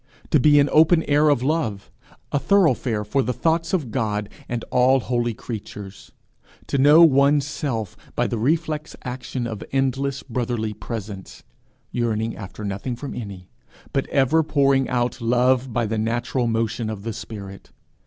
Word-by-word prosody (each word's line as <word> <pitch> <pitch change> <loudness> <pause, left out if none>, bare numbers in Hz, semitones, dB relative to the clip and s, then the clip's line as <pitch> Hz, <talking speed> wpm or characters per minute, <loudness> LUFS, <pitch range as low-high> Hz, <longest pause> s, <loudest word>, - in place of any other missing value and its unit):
to 150 - +5
be 145 +2 +6
an 140 - +4
open 160 +1 +5
air 150 +1 +3
of 135 -4 +2
love, 135 -9 -1 0.4
a 145 - +1
thoroughfare 130 - +2
for 135 +6 +1
the 125 - -1
thoughts 165 +4 0
of 150 -11 -1
God 105 -4 -1 0.2
and 120 -1 -3
all 130 +1 +4
holy 120 -2 -1
creatures! 100 -4 -8 0.5
to 140 - -1
know 150 +5 +7
one's 140 -2 +4
self 125 - -3 0.2
by - - +1
the 115 - -2
reflex 155 +4 -1
action 125 0 -4
of 110 -3 -5
endless 135 0 -1
brotherly 120 -3 -2
presence 105 -3 -7 0.5
yearning 115 -2 -1
after 105 +1 -8
nothing 100 +5 -3
from 140 +3 -7
any, 100 -5 -7 0.5
but 135 - 0
ever 140 +4 +3
pouring 140 -3 +2
out 120 0 -1
love 125 +2 +2
by 120 +1 0
the 110 0 -2
natural 120 +2 -1
motion 115 0 -1
of 105 -2 -6
the 115 0 -3
spirit! 100 -3 -9
125 Hz, 155 wpm, -23 LUFS, 110-140 Hz, 0.5 s, know